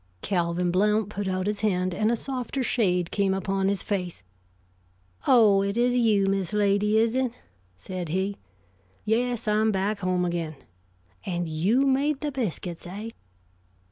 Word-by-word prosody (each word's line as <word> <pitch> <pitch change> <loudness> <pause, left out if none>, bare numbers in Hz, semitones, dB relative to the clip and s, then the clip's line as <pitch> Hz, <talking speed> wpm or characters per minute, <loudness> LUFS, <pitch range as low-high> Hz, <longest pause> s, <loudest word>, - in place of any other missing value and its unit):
Calvin 175 -1 0
Blount 210 +3 +2
put 205 -1 -4
out 185 0 -1
his 210 0 -2
hand, 185 -4 0
and 215 +5 +1
a - - +2
softer 260 +1 -3
shade 180 -8 +1
came 195 -2 +1
upon 195 0 -1
his 200 -1 0
face. 180 - -3 1.0
"Oh, 215 -6 +6
it 200 +2 -1
is 245 +1 +2
you, 220 -5 +3
Miss 195 0 -1
Lady, 210 +1 +2
is 225 +1 +3
it?" 255 -2 0 0.4
said 180 - -6
he. 190 +4 -1 0.7
"Yes, 235 +1 0
I'm 215 +1 +3
back 200 +1 -1
home 180 -1 0
again. 170 -3 -3 0.7
And 175 -2 -2
you 190 - +2
made 275 +2 +1
the 300 -1 -2
biscuits, 185 - -4
eh?" 210 +5 -6
200 Hz, 150 wpm, -26 LUFS, 185-225 Hz, 1.0 s, Oh